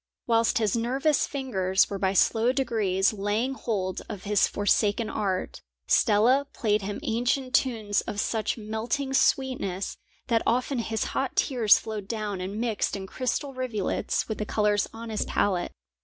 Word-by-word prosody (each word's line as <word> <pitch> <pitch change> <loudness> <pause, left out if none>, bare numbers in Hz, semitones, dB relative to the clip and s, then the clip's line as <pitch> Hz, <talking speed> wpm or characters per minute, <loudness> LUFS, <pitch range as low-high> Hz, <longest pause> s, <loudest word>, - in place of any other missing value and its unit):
Whilst 230 -1 +2
his 215 -2 +1
nervous 265 +6 +1
fingers 190 -9 +1
were 200 - -5
by 190 0 +1
slow 225 +5 +3
degrees 220 -7 +1
laying 210 +6 -1
hold 195 -8 -3
of 205 -4 -6
his 205 -1 +3
forsaken 205 +2 +1
art, 190 -3 -2 0.2
Stella 245 +6 +3
played 210 -2 +1
him 200 +1 -4
ancient 250 +1 0
tunes 225 -7 +1
of 210 -3 -3
such 220 +1 -1
melting 225 +5 -3
sweetness 250 -9 0 0.3
that 230 -2 +2
often 250 +2 0
his 220 -2 -1
hot 270 -1 -1
tears 235 -6 +4
flowed 215 -3 -6
down 210 -4 -3
and 195 +3 -4
mixed 225 -4 -1
in 195 -1 -5
crystal 260 +6 -3
rivulets 250 -6 -2
with 220 - -4
the - - 0
colours 210 -2 +1
on 225 0 -8
his 215 - -1
palette. 185 -3 0
220 Hz, 155 wpm, -26 LUFS, 205-245 Hz, 0.3 s, tears